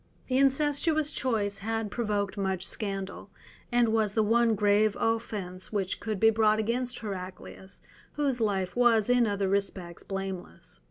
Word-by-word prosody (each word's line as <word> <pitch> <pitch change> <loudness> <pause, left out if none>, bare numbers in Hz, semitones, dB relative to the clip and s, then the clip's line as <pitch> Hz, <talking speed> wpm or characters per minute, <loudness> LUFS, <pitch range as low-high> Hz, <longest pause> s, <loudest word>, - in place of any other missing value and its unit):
The 255 +1 +2
incestuous 295 +3 +2
choice 205 -5 -1
had 225 0 -3
provoked 205 -4 -1
much 190 -2 -1
scandal, 195 -2 -4 0.4
and 240 -1 +3
was 220 -2 +1
the 220 - +3
one 230 +1 +3
grave 210 0 +3
offence 210 -5 -2
which 195 -3 -2
could 215 -3 -3
be 225 +2 +6
brought 215 -1 +3
against 240 +3 -1
Heraclius, 190 -1 -8 0.3
whose 275 -5 -1
life 195 -4 0
was 240 -2 +4
in 245 -2 +4
other 200 -1 0
respects 190 -3 -2
blameless. 190 - -6
215 Hz, 145 wpm, -28 LUFS, 195-235 Hz, 0.4 s, be